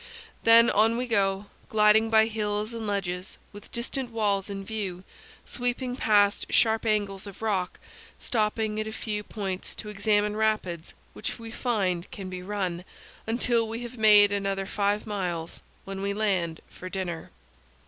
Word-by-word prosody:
Then 230 Hz, +1 st, +7 dB
on 220 Hz, +3 st, +3 dB
we 250 Hz, -, -1 dB
go, 200 Hz, -4 st, +1 dB, 0.2 s
gliding 220 Hz, +1 st, +5 dB
by 220 Hz, 0 st, +6 dB
hills 210 Hz, 0 st, -2 dB
and 225 Hz, -2 st, -4 dB
ledges, 190 Hz, -2 st, -3 dB, 0.2 s
with 205 Hz, 0 st, -12 dB
distant 245 Hz, +2 st, -2 dB
walls 205 Hz, -3 st, 0 dB
in 195 Hz, -1 st, -5 dB
view; 190 Hz, -4 st, -4 dB, 0.4 s
sweeping 245 Hz, 0 st, -2 dB
past 205 Hz, -4 st, +2 dB
sharp 225 Hz, 0 st, +3 dB
angles 205 Hz, -2 st, 0 dB
of 200 Hz, +2 st, -10 dB
rock; 190 Hz, -5 st, -1 dB, 0.4 s
stopping 215 Hz, -1 st, 0 dB
at 215 Hz, -, -2 dB
a -, -, -4 dB
few 210 Hz, -1 st, -3 dB
points 195 Hz, -3 st, -5 dB
to 210 Hz, -, -7 dB
examine 210 Hz, 0 st, +1 dB
rapids, 215 Hz, -6 st, -1 dB, 0.2 s
which 215 Hz, -, -4 dB
we 230 Hz, -1 st, -9 dB
find 195 Hz, -8 st, -1 dB
can 190 Hz, -2 st, -7 dB
be 180 Hz, 0 st, -5 dB
run, 185 Hz, -3 st, -3 dB, 0.4 s
until 230 Hz, 0 st, +1 dB
we 225 Hz, +2 st, -4 dB
have 240 Hz, +1 st, -7 dB
made 210 Hz, -2 st, +7 dB
another 195 Hz, -1 st, -1 dB
five 205 Hz, +1 st, 0 dB
miles, 180 Hz, -6 st, -3 dB, 0.2 s
when 195 Hz, 0 st, -5 dB
we 200 Hz, 0 st, -1 dB
land 185 Hz, -6 st, 0 dB
for 185 Hz, -, -9 dB
dinner. 180 Hz, -4 st, -4 dB
210 Hz, 155 wpm, -27 LUFS, 195-220 Hz, 0.4 s, Then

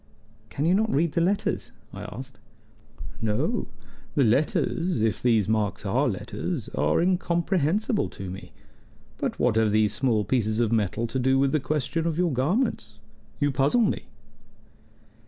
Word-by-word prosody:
"Can 145 Hz, -, -2 dB
you 170 Hz, -, +4 dB
not 220 Hz, +3 st, +2 dB
read 160 Hz, +3 st, +2 dB
the 170 Hz, -, 0 dB
letters?" 195 Hz, +4 st, 0 dB, 0.2 s
I -, -, -7 dB
asked. 130 Hz, +2 st, -9 dB, 0.8 s
"No. 105 Hz, -1 st, 0 dB, 0.5 s
The 140 Hz, -, +4 dB
letters 150 Hz, +4 st, +1 dB
if 110 Hz, -, 0 dB
these 115 Hz, -5 st, +3 dB
marks 110 Hz, -2 st, -1 dB
are -, -, +2 dB
letters -, -, -4 dB
are 75 Hz, +1 st, +1 dB
incomprehensible 180 Hz, -, +1 dB
to 95 Hz, -2 st, -7 dB
me. 95 Hz, -, -9 dB, 0.7 s
But -, -, -2 dB
what 120 Hz, -2 st, +2 dB
have 110 Hz, -1 st, +3 dB
these 105 Hz, -1 st, +2 dB
small 110 Hz, -3 st, +1 dB
pieces 110 Hz, -3 st, 0 dB
of 115 Hz, -2 st, +1 dB
metal 110 Hz, 0 st, 0 dB
to 120 Hz, +3 st, -3 dB
do 130 Hz, +1 st, +3 dB
with 135 Hz, 0 st, +2 dB
the 155 Hz, -, +2 dB
question 155 Hz, +4 st, -1 dB
of 165 Hz, -2 st, -1 dB
your 175 Hz, -4 st, +1 dB
garments? 130 Hz, -, -1 dB, 0.4 s
You 145 Hz, 0 st, +2 dB
puzzle 140 Hz, -, +2 dB
me." 220 Hz, -, 0 dB
135 Hz, 155 wpm, -26 LUFS, 110-170 Hz, 0.8 s, you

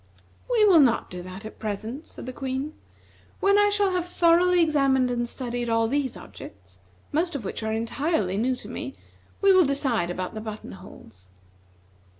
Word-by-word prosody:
"We 460 Hz, -4 st, +4 dB
will 370 Hz, -5 st, +7 dB
not 255 Hz, -6 st, +3 dB
do 180 Hz, -1 st, -6 dB
that 185 Hz, +4 st, -9 dB
at 220 Hz, -, -10 dB
present," 220 Hz, +8 st, -5 dB
said -, -, -10 dB
the 255 Hz, -, -6 dB
Queen. 270 Hz, +3 st, -4 dB, 0.7 s
"When 400 Hz, +1 st, +4 dB
I 410 Hz, 0 st, +5 dB
shall 405 Hz, -1 st, +2 dB
have 360 Hz, -1 st, -1 dB
thoroughly 355 Hz, +1 st, +4 dB
examined 275 Hz, -6 st, +3 dB
and 240 Hz, -1 st, -1 dB
studied 245 Hz, -2 st, -4 dB
all 225 Hz, 0 st, +2 dB
these 275 Hz, +1 st, -1 dB
objects, 95 Hz, -1 st, -13 dB, 0.3 s
most 335 Hz, +2 st, 0 dB
of 245 Hz, -7 st, -4 dB
which -, -, -4 dB
are 220 Hz, 0 st, -2 dB
entirely 225 Hz, -, -1 dB
new 250 Hz, +4 st, +1 dB
to -, -, -11 dB
me, -, -, -6 dB, 0.5 s
we 395 Hz, -1 st, +6 dB
will 370 Hz, -1 st, +6 dB
decide 270 Hz, -, 0 dB
about 180 Hz, +1 st, -4 dB
the 215 Hz, -, -6 dB
button 215 Hz, -1 st, -7 dB
holes." 95 Hz, -, -14 dB
255 Hz, 175 wpm, -25 LUFS, 220-335 Hz, 0.7 s, will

